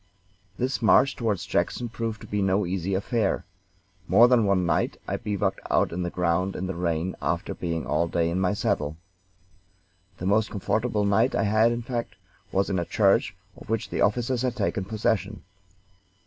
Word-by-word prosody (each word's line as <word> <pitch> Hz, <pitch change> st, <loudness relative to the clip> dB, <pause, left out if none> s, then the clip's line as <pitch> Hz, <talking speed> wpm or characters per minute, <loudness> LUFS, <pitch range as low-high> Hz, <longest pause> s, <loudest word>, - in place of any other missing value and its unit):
This 130 Hz, +1 st, -1 dB
march 130 Hz, +4 st, +4 dB
toward 110 Hz, -4 st, 0 dB
Jackson 120 Hz, +7 st, -1 dB
proved 115 Hz, -1 st, -4 dB
to -, -, -10 dB
be 105 Hz, 0 st, -1 dB
no 95 Hz, +1 st, +2 dB
easy 95 Hz, +1 st, -2 dB
affair. 105 Hz, +1 st, 0 dB, 0.6 s
More 100 Hz, +8 st, +7 dB
than 120 Hz, -3 st, +4 dB
one 95 Hz, -2 st, +2 dB
night 85 Hz, -2 st, 0 dB
I -, -, -1 dB
bivouacked 100 Hz, -2 st, -1 dB
on 90 Hz, -, +1 dB
the 90 Hz, -, -1 dB
ground 90 Hz, +2 st, 0 dB
in 95 Hz, -, -3 dB
the 95 Hz, -, -3 dB
rain 85 Hz, 0 st, -2 dB
after -, -, -1 dB
being 85 Hz, -2 st, -3 dB
all 75 Hz, +3 st, +1 dB
day 85 Hz, 0 st, 0 dB
in 90 Hz, -, -1 dB
my 95 Hz, +1 st, +1 dB
saddle. 100 Hz, -9 st, -1 dB, 1.2 s
The 90 Hz, -, -6 dB
most 105 Hz, +3 st, +2 dB
comfortable 105 Hz, +1 st, -1 dB
night 110 Hz, +6 st, +2 dB
I -, -, +1 dB
had, 110 Hz, +2 st, +3 dB
in 120 Hz, 0 st, -3 dB
fact, 120 Hz, -1 st, -4 dB, 0.4 s
was 95 Hz, +1 st, +1 dB
in 95 Hz, -2 st, 0 dB
a 85 Hz, -, -2 dB
church 100 Hz, -2 st, +2 dB, 0.2 s
of -, -, -14 dB
which 115 Hz, -1 st, -2 dB
the -, -, -1 dB
officers 120 Hz, +3 st, +1 dB
had 125 Hz, -2 st, -1 dB
taken 100 Hz, -6 st, -1 dB
possession. 105 Hz, -1 st, -1 dB
100 Hz, 175 wpm, -26 LUFS, 90-115 Hz, 1.2 s, More